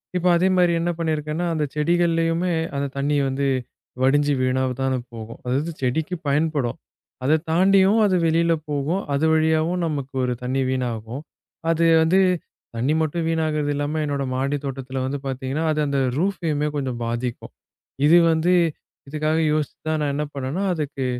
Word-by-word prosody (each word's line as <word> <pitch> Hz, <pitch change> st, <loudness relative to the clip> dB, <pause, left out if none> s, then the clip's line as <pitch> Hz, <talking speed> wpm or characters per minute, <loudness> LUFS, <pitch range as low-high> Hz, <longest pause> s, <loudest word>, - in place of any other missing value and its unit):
இப்ப 180 Hz, 0 st, +1 dB
அதே 185 Hz, -, +2 dB
மாரி 175 Hz, -1 st, +4 dB
என்ன 175 Hz, -, 0 dB
பண்ணி 165 Hz, -2 st, 0 dB
இருக்கேன்னா, 155 Hz, +3 st, -3 dB
அந்தச் 150 Hz, -3 st, -2 dB
செடிகள்லயுமே 165 Hz, +2 st, +1 dB, 0.2 s
அந்தத் 140 Hz, -1 st, -3 dB
தண்ணி 145 Hz, +2 st, +1 dB
வந்து 140 Hz, +1 st, -1 dB, 0.5 s
வடிஞ்சு 145 Hz, +2 st, +3 dB
வீணாவதான் 130 Hz, 0 st, 0 dB, 0.2 s
போகும். 115 Hz, 0 st, -8 dB
அதாவது 140 Hz, +7 st, -1 dB
செடிக்கு 155 Hz, +8 st, -1 dB
பயன்படும். 145 Hz, -4 st, 0 dB, 0.5 s
அது 150 Hz, +4 st, +4 dB, 0.2 s
தாண்டியும் 195 Hz, +4 st, +4 dB
அது 190 Hz, -2 st, +2 dB
வெளியில 165 Hz, +1 st, +3 dB, 0.2 s
போகும், 150 Hz, +6 st, -1 dB
அது 140 Hz, +3 st, +1 dB
வழியாவும் 160 Hz, +3 st, +2 dB
நமக்கு 140 Hz, -4 st, -3 dB
ஒரு 125 Hz, 0 st, 0 dB
தண்ணி 130 Hz, +2 st, 0 dB
வீணாகும். 125 Hz, +1 st, -3 dB, 0.5 s
அது 165 Hz, 0 st, +2 dB, 0.2 s
வந்து 170 Hz, +4 st, +4 dB, 0.6 s
தண்ணி 125 Hz, +6 st, +1 dB
மட்டும் 160 Hz, +2 st, -1 dB
வீணாகுறது 155 Hz, -2 st, 0 dB
இல்லாம 145 Hz, +2 st, -2 dB
என்னோட 140 Hz, -1 st, -2 dB
மாடித் 140 Hz, +2 st, -1 dB
தோட்டத்துல 135 Hz, -1 st, -4 dB
வந்து 140 Hz, +2 st, -3 dB
பாத்தீங்கன்னா, 135 Hz, +3 st, -3 dB
அது 155 Hz, -, -1 dB
அந்த 140 Hz, -1 st, 0 dB, 0.2 s
ரூஃபயுமே 160 Hz, -5 st, 0 dB
கொஞ்சம் 130 Hz, -4 st, -3 dB
பாதிக்கும். 120 Hz, +1 st, -4 dB, 0.5 s
இது 170 Hz, +2 st, +7 dB
வந்து 160 Hz, +3 st, +2 dB, 0.6 s
இதுக்காக 155 Hz, +2 st, 0 dB
யோசிச்சுதான் 155 Hz, +1 st, -2 dB
நான் 145 Hz, -1 st, 0 dB
என்ன 150 Hz, -, -1 dB
பண்ணேன்னா, 140 Hz, +7 st, -3 dB
அதுக்கு 145 Hz, -4 st, -3 dB
150 Hz, 145 wpm, -23 LUFS, 135-165 Hz, 0.6 s, இது